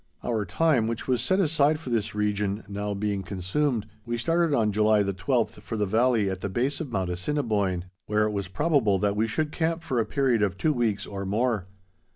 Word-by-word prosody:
Our 110 Hz, -4 st, -1 dB
time, 150 Hz, -7 st, +2 dB
which 115 Hz, 0 st, -4 dB
was 125 Hz, -3 st, +1 dB
set 185 Hz, +10 st, +2 dB
aside 155 Hz, -3 st, +3 dB
for 130 Hz, -6 st, -7 dB
this 110 Hz, -2 st, -1 dB
region, 105 Hz, 0 st, -1 dB
now 100 Hz, 0 st, -3 dB
being 100 Hz, -1 st, -1 dB
consumed, 100 Hz, +7 st, -1 dB, 0.2 s
we 120 Hz, +1 st, -3 dB
started 165 Hz, +7 st, +1 dB
on 110 Hz, -7 st, +2 dB
July 105 Hz, 0 st, +3 dB
the 100 Hz, 0 st, -1 dB
twelfth 115 Hz, +2 st, -1 dB
for 115 Hz, -, -5 dB
the 105 Hz, -, +1 dB
valley 115 Hz, +1 st, +2 dB
at 95 Hz, -1 st, -3 dB
the 100 Hz, -, -2 dB
base 125 Hz, -, -1 dB
of 145 Hz, -6 st, -5 dB
Mount 95 Hz, -4 st, -1 dB
Assiniboine, 100 Hz, -3 st, -1 dB, 0.2 s
where 105 Hz, 0 st, +2 dB
it 105 Hz, -, 0 dB
was 100 Hz, -2 st, -3 dB
probable 125 Hz, -, +2 dB
that 100 Hz, +1 st, 0 dB
we 110 Hz, +2 st, +1 dB
should 150 Hz, +7 st, -1 dB
camp 165 Hz, +1 st, -1 dB
for 130 Hz, -6 st, -1 dB
a 115 Hz, -, +1 dB
period 130 Hz, -5 st, +1 dB
of 95 Hz, -3 st, 0 dB
two 155 Hz, +8 st, +2 dB
weeks 115 Hz, -6 st, 0 dB
or 100 Hz, -1 st, -5 dB
more. 105 Hz, -1 st, 0 dB
110 Hz, 210 wpm, -26 LUFS, 100-135 Hz, 0.2 s, aside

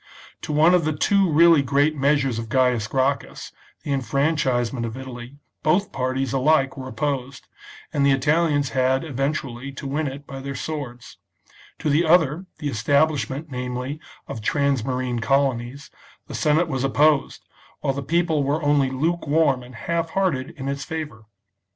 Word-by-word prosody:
To -, -, -5 dB
one 155 Hz, +4 st, +5 dB
of 180 Hz, -2 st, +4 dB
the 155 Hz, -1 st, -1 dB
two 195 Hz, +1 st, +3 dB
really 165 Hz, 0 st, +6 dB
great 140 Hz, +3 st, +2 dB
measures 135 Hz, -4 st, +1 dB
of 115 Hz, -1 st, -6 dB
Gaius 125 Hz, -4 st, +2 dB
Gracchus, 135 Hz, +3 st, -1 dB, 0.3 s
the -, -, -4 dB
enfranchisement 130 Hz, -2 st, 0 dB
of 115 Hz, +1 st, -5 dB
Italy, 130 Hz, 0 st, -9 dB, 0.2 s
both 180 Hz, +6 st, +1 dB
parties, 130 Hz, 0 st, -2 dB
alike, 135 Hz, 0 st, +2 dB
were 130 Hz, -1 st, -7 dB
opposed, 135 Hz, -1 st, -3 dB, 0.5 s
and 140 Hz, -, +1 dB
the 140 Hz, -, +4 dB
Italians 145 Hz, +1 st, +2 dB
had 130 Hz, 0 st, +1 dB
eventually 135 Hz, -3 st, -3 dB
to 140 Hz, -, -8 dB
win 145 Hz, +3 st, -1 dB
it 140 Hz, +2 st, -7 dB
by 135 Hz, -1 st, -8 dB
their 140 Hz, 0 st, -6 dB
swords; 130 Hz, -4 st, -6 dB, 0.6 s
to -, -, -4 dB
the 155 Hz, +4 st, +3 dB
other, 165 Hz, +1 st, +3 dB
the 150 Hz, -, -4 dB
establish 145 Hz, +4 st, +1 dB
ment, 145 Hz, +3 st, -6 dB
namely, 125 Hz, +3 st, -4 dB, 0.3 s
of 110 Hz, -, -6 dB
transmarine 130 Hz, -2 st, 0 dB
colonies, 135 Hz, 0 st, 0 dB, 0.3 s
the -, -, -10 dB
Senate 155 Hz, +3 st, +2 dB
was 135 Hz, -4 st, -2 dB
opposed, 145 Hz, +1 st, +2 dB, 0.4 s
while 135 Hz, -, 0 dB
the 140 Hz, -, -4 dB
people 165 Hz, +1 st, +1 dB
were 145 Hz, +3 st, -1 dB
only 145 Hz, -2 st, +3 dB
lukewarm 150 Hz, -1 st, +1 dB
and 125 Hz, 0 st, -12 dB
half 165 Hz, +6 st, -2 dB
hearted 165 Hz, -8 st, 0 dB
in 135 Hz, -1 st, -5 dB
its 140 Hz, 0 st, -3 dB
favour. 145 Hz, -9 st, -6 dB
140 Hz, 155 wpm, -23 LUFS, 130-155 Hz, 0.6 s, really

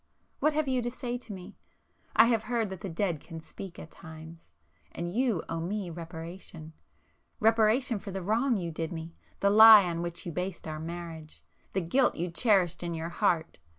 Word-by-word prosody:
What 305 Hz, -, +2 dB
have 305 Hz, -1 st, 0 dB
you 260 Hz, -1 st, +1 dB
to 240 Hz, -, -2 dB
say 245 Hz, 0 st, -4 dB
to 240 Hz, -, -11 dB
me?—I 190 Hz, +3 st, -2 dB
have 230 Hz, -2 st, +2 dB
heard 225 Hz, -3 st, -1 dB
that 190 Hz, -2 st, -7 dB
the 195 Hz, -, -5 dB
dead 170 Hz, -2 st, -1 dB
can 165 Hz, +2 st, -9 dB
speak 170 Hz, +3 st, -10 dB
at 160 Hz, -, -10 dB
times,—and 165 Hz, +1 st, -10 dB
you 235 Hz, -7 st, +1 dB
owe 165 Hz, -, -3 dB
me 185 Hz, +2 st, -3 dB
reparation,—reparation 180 Hz, -, -2 dB
for 200 Hz, -, -9 dB
the 190 Hz, -1 st, -5 dB
wrong 230 Hz, +5 st, +1 dB
you 170 Hz, -3 st, -3 dB
did 160 Hz, 0 st, -4 dB
me,—the 165 Hz, +4 st, -4 dB
lie 220 Hz, 0 st, +10 dB
on 170 Hz, -2 st, -2 dB
which 170 Hz, 0 st, -5 dB
you 175 Hz, -, -4 dB
based 180 Hz, +1 st, -4 dB
our 155 Hz, 0 st, -5 dB
marriage,—the 165 Hz, +2 st, -7 dB
guilt 250 Hz, +10 st, +2 dB
you 175 Hz, +1 st, -3 dB
cherished 190 Hz, -3 st, +3 dB
in 170 Hz, -1 st, -3 dB
your 165 Hz, +1 st, -4 dB
heart! 170 Hz, -, 0 dB
180 Hz, 170 wpm, -29 LUFS, 165-220 Hz, -, lie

